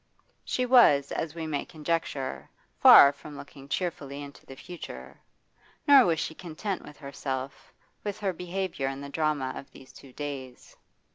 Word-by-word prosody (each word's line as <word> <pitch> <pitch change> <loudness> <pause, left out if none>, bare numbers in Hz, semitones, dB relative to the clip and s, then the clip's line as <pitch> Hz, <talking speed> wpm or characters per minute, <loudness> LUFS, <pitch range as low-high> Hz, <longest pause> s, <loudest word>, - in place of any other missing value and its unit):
She 255 - -1
F 250 - -3
was, 145 - +6
as 160 0 -3
we 165 -1 -4
may 150 -2 -2
conjecture, 155 -4 -3 0.3
far 140 - +9
from 145 +1 -11
looking 140 -1 -12
cheerfully 145 -4 -3
into 140 0 -12
the 135 - -10
future. 175 +5 -10 0.7
Nor 275 -5 +8
was 165 -2 +1
she 160 - -3
content 180 +4 -5
with 150 - -13
herself, 140 -1 -6 0.3
with 205 -1 -4
her 195 -2 0
behaviour 180 -4 -3
in 135 0 -4
the 140 - -7
drama 145 -3 -1
of - - -9
these 130 - -16
two 135 - -14
days. 135 -3 -8
150 Hz, 160 wpm, -28 LUFS, 140-175 Hz, 0.7 s, far